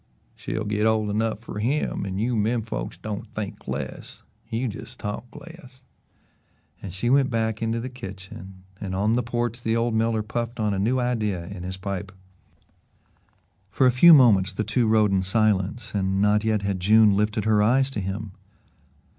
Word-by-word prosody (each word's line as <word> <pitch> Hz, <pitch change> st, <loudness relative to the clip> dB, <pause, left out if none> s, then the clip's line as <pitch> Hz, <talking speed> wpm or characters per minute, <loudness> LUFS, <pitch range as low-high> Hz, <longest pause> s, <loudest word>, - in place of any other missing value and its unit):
"She'll 110 Hz, -, -4 dB
git 105 Hz, +1 st, +1 dB
ole 110 Hz, -2 st, +1 dB
enough 110 Hz, +1 st, -1 dB
fer 115 Hz, -, -7 dB
HIM 120 Hz, -3 st, -1 dB
an' 95 Hz, 0 st, -4 dB
you 120 Hz, +4 st, 0 dB
menfolks 110 Hz, +1 st, -2 dB
don't 105 Hz, -2 st, -6 dB
think 105 Hz, -2 st, -6 dB
less -, -, -6 dB, 0.3 s
you 120 Hz, +3 st, -1 dB
jes' 110 Hz, 0 st, -8 dB
talk 105 Hz, +2 st, -5 dB
less." 135 Hz, -7 st, -13 dB, 1.0 s
And 95 Hz, -, -7 dB
she 110 Hz, +7 st, -1 dB
went 135 Hz, -1 st, +4 dB
back 110 Hz, -1 st, -1 dB
into 115 Hz, +1 st, -1 dB
the 120 Hz, -, -4 dB
kitchen, 95 Hz, -5 st, -10 dB, 0.2 s
and 95 Hz, -2 st, -4 dB
on 105 Hz, +3 st, +1 dB
the 120 Hz, -, +2 dB
porch 120 Hz, 0 st, -3 dB
the 115 Hz, -1 st, 0 dB
old 115 Hz, 0 st, 0 dB
miller 110 Hz, 0 st, +1 dB
puffed 115 Hz, +2 st, -4 dB
on 105 Hz, -2 st, +1 dB
a 95 Hz, -, -2 dB
new 120 Hz, +6 st, +1 dB
idea 105 Hz, -8 st, -1 dB
in 95 Hz, +1 st, -8 dB
his 95 Hz, +1 st, -5 dB
pipe. 100 Hz, 0 st, -5 dB, 1.6 s
For 130 Hz, +6 st, +2 dB
a 125 Hz, -, +6 dB
few 160 Hz, +7 st, +8 dB
minutes 100 Hz, -8 st, +5 dB
the 110 Hz, -, -2 dB
two 120 Hz, +1 st, +1 dB
rode 110 Hz, -2 st, +3 dB
in 95 Hz, -1 st, +2 dB
silence 105 Hz, +2 st, 0 dB
and 95 Hz, -1 st, 0 dB
not 105 Hz, +1 st, +3 dB
yet 110 Hz, -2 st, 0 dB
had 100 Hz, -2 st, -1 dB
June 105 Hz, +2 st, +5 dB
lifted 105 Hz, +1 st, 0 dB
her 110 Hz, -1 st, +3 dB
eyes 130 Hz, +5 st, +3 dB
to 120 Hz, -, -3 dB
him. 100 Hz, +2 st, -4 dB
110 Hz, 180 wpm, -24 LUFS, 100-115 Hz, 1.6 s, few